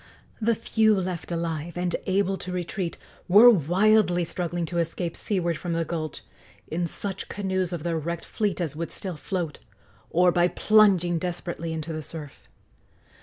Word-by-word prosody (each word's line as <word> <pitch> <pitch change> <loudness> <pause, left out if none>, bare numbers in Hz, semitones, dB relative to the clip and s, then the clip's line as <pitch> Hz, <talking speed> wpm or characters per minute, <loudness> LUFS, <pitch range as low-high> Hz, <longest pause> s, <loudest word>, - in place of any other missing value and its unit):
The 230 +1 +3
few 220 -2 +2
left 180 -2 -4
alive 165 0 -3
and 175 0 0
able 195 0 +2
to 185 0 -6
retreat 180 0 -3 0.3
were 215 +7 +9
wildly 185 - +3
struggling 175 0 -2
to 170 +1 -2
escape 170 +1 -2
seaward 175 -5 -1
from 175 -2 -3
the 165 0 0
gulch 155 -3 -4 0.4
in 170 +2 -1
such 195 +3 -4
canoes 190 -3 -1
of 170 -4 -4
their 170 -1 -1
wrecked 170 +2 -4
fleet 210 -4 -1
as 160 -5 -2
would 165 +1 -4
still 185 -3 -5
float, 165 -1 -4 0.5
or 180 +1 +4
by 175 0 +3
plunging 180 -3 +4
desperately 175 -1 -4
into 160 0 -4
the 155 - -4
surf. 150 -2 -8
175 Hz, 160 wpm, -26 LUFS, 165-190 Hz, 0.5 s, were